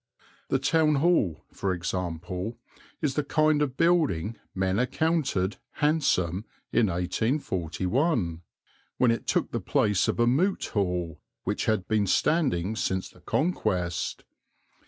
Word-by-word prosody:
The 135 - +3
Town 155 +3 +3
Hall, 140 - +2
for 95 -1 -1
example, 90 +3 -4 0.5
is 145 -3 +1
the 150 - 0
kind 155 +1 +2
of 135 -3 -1
building 150 - +2 0.2
men 95 +1 +1
accounted 130 - 0 0.2
"handsome" 110 - +1 0.3
in 115 - +3
1841, 95 - 0 0.6
when 125 -2 +4
it 115 - -3
took - - +1
the - - -1
place 105 -3 +2
of - - -1
a 120 - +5
Moot 165 +11 +2
Hall 90 -5 -1 0.2
which 105 +2 -1
had 110 -5 0
been 105 -2 +1
standing 110 - +1
since 95 -3 -1
the 90 - -20
Conquest. 90 - -1
110 Hz, 125 wpm, -27 LUFS, 90-150 Hz, 0.6 s, a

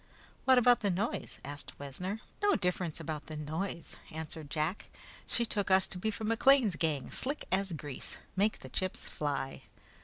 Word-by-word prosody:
"What 260 -1 +7
about 245 0 +7
the 205 - +1
noise?" 195 +5 -1
asked 145 +1 -7
Wessner. 180 +10 -4 0.2
"No 410 0 +5
difference 180 -4 0
about 155 -2 -4
the 155 - -5
noise," 160 +4 -3
answered 160 -1 -6
Jack. 155 +6 -1 0.4
"She 235 - +1
took 205 -3 0
us 190 0 +5
to 180 - -4
be 220 - +1
from 220 0 -2
McLean's 230 - +5
gang, 155 -6 0
slick 285 +3 -1
as 190 0 +2
grease. 145 -3 -5 0.2
Make 205 +3 +2
the - - -8
chips 185 0 -2
fly!" 140 -2 -2
180 Hz, 165 wpm, -33 LUFS, 155-215 Hz, 0.4 s, What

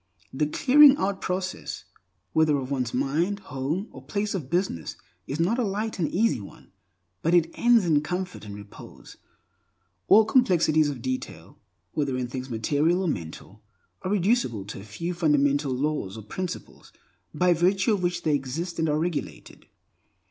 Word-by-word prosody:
The 150 +3 0
clearing 280 - +6
out 195 0 -1
process, 185 0 -4 0.5
whether 155 -2 +3
of 135 0 -5
one's 125 -4 -1
mind, 155 +10 0
home, 155 - -3
or - - -11
place 205 0 -2
of 160 -10 -4
business, 170 - -1 0.3
is 140 - -4
not 200 +9 +1
a - - +2
light 210 +1 -3
and 165 - 0
easy 215 - +1
one, 100 - -14 0.5
but 165 +2 +2
it 170 -2 +3
ends 235 -4 +4
in 155 -4 +3
comfort 180 - -4
and 105 -1 -8
repose. 100 0 -13 0.9
All 220 +2 +7
complexities 170 - +3
of 130 -5 -6
detail, 130 0 -5 0.3
whether 140 -4 -1
in 125 -1 -2
things 130 +1 -6
material 145 +10 +1
or - - -1
mental, 95 - -6 0.4
are - - -3
reducible 190 - +1
to - - -8
a - - -10
few 140 - -5
fundamental 145 -4 +2
laws 130 -6 -2
or 110 - -8
principles 180 - -7 0.4
by 180 0 +3
virtue 190 +5 +2
of 200 - -1
which 175 0 -1
they 155 - +2
exist 150 +6 -3
and 160 -1 +1
are 150 - +1
regulated. 165 0 -4
160 Hz, 165 wpm, -26 LUFS, 135-190 Hz, 0.9 s, All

